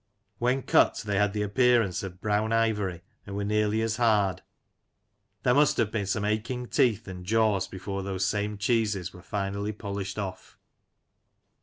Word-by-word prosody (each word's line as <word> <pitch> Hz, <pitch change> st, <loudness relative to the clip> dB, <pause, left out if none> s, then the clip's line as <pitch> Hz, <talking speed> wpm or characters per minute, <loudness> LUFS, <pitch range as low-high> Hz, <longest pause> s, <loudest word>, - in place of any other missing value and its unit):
When 125 Hz, +2 st, +1 dB
cut, -, -, +3 dB
they 100 Hz, -2 st, 0 dB
had 105 Hz, -1 st, +3 dB
the 105 Hz, -1 st, -1 dB
appearance 115 Hz, -2 st, +2 dB
of 95 Hz, -1 st, -8 dB
brown 105 Hz, +1 st, 0 dB
ivory, 105 Hz, -6 st, 0 dB, 0.3 s
and 100 Hz, -, -6 dB
were 100 Hz, -, -2 dB
nearly 105 Hz, +1 st, +1 dB
as 110 Hz, -1 st, -1 dB
hard. 105 Hz, -6 st, +2 dB, 1.0 s
There 125 Hz, -, +4 dB
must 145 Hz, +2 st, +4 dB
have 110 Hz, -2 st, +1 dB
been 105 Hz, -3 st, -2 dB
some 105 Hz, +1 st, -1 dB
aching 115 Hz, +4 st, -2 dB
teeth 110 Hz, -6 st, +2 dB
and 90 Hz, -1 st, -7 dB
jaws 105 Hz, -1 st, +2 dB
before 95 Hz, +1 st, -5 dB
those 95 Hz, -1 st, -2 dB
same 105 Hz, +1 st, -1 dB
cheeses 100 Hz, -3 st, 0 dB
were 90 Hz, -, -12 dB
finally 100 Hz, +3 st, -3 dB
polished 100 Hz, -2 st, -5 dB
off! 95 Hz, -3 st, -6 dB
105 Hz, 160 wpm, -27 LUFS, 100-110 Hz, 1.0 s, There